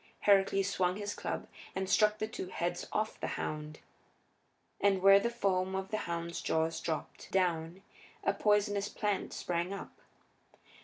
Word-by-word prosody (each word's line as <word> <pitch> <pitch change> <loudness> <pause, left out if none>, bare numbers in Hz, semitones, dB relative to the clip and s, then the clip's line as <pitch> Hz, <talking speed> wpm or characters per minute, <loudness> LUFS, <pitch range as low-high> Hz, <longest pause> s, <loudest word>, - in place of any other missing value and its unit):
Heracles 195 -1 +4
swung 185 -2 +1
his 205 0 -3
club - - -4 0.3
and 190 0 -1
struck 210 +2 +4
the 215 - -2
two 200 - -5
heads 175 -1 -3
off 215 +1 -1
the - - -2
hound. 150 0 -4 1.0
And 200 -1 +3
where 195 0 +9
the 235 - 0
foam 190 -5 0
of 190 0 -3
the 215 - 0
hound's 170 0 -3
jaws 160 0 0
dropped 160 -2 -4
down 175 -1 0 0.4
a 200 - +2
poisonous 205 0 +2
plant 205 -2 -1
sprang 175 +2 -2
up. - - -10
190 Hz, 150 wpm, -32 LUFS, 175-205 Hz, 1.0 s, where